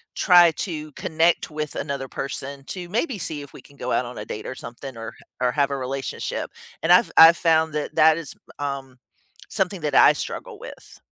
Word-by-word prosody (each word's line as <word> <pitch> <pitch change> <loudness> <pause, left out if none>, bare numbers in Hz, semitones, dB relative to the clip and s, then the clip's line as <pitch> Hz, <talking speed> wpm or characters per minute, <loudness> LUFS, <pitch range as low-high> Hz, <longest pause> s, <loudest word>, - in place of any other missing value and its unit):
try 175 -3 +6
to 155 -3 -5
connect 160 +2 +1
with 150 -1 -4
another 140 -2 -4
person 135 +1 -6
to 180 +2 -7
maybe 235 - -1
see 155 -3 -3
if 140 - -11
we - - -12
can 140 +1 -20
go 125 - -4
out 125 - +1
on 120 0 -9
a 105 - -6
date 105 - -7
or - - -5
something 120 +2 -9
or 115 0 -6
h - - -17 0.2
or 125 - +2
have 140 +1 0
a 140 - -2
relationship, 135 0 -4 0.3
and - - +2
I've - - +5
I've 165 +1 +9
found 160 -2 +2
that 150 -1 -4
that 160 +1 +5
is, 145 -5 -7 0.2
um, 135 -3 -5 0.5
something 190 -2 -1
that 150 -3 -2
I - - +7
struggle - - -6
with. - - -12
145 Hz, 205 wpm, -23 LUFS, 135-165 Hz, 0.5 s, I've